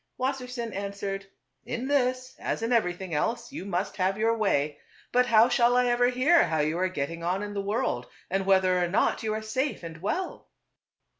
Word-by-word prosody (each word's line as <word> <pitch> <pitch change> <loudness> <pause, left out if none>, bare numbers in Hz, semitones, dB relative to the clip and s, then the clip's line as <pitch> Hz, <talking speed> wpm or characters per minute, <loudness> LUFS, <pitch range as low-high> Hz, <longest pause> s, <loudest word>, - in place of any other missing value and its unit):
Wassersein 250 -3 -3
an 200 0 -4
swered, 195 -1 -4 0.2
" - - -52
In 245 +3 -2
this, 255 -2 0
as - - -2
in 230 +2 +1
everything 180 -5 0
else, 235 - -1
you 275 - -6
must 185 0 -2
have 190 +1 +1
your 225 +1 +2
way; 150 -9 0 0.3
but 250 0 +3
how 225 0 +6
shall 245 0 +3
I 250 - +4
ever 245 0 +3
hear 260 +8 +4
how 160 -2 -1
you 155 +3 0
are 185 0 +1
getting 165 0 -4
on 185 +4 0
in 205 0 -5
the 200 - -2
world, 200 - -1 0.2
and 195 +1 -1
whether 185 -2 +4
or - - +1
not 185 - +1
you 220 - -2
are 220 - -4
safe 255 +2 -2
and 165 -1 -8
well 355 - -3
210 Hz, 205 wpm, -27 LUFS, 185-245 Hz, 0.3 s, how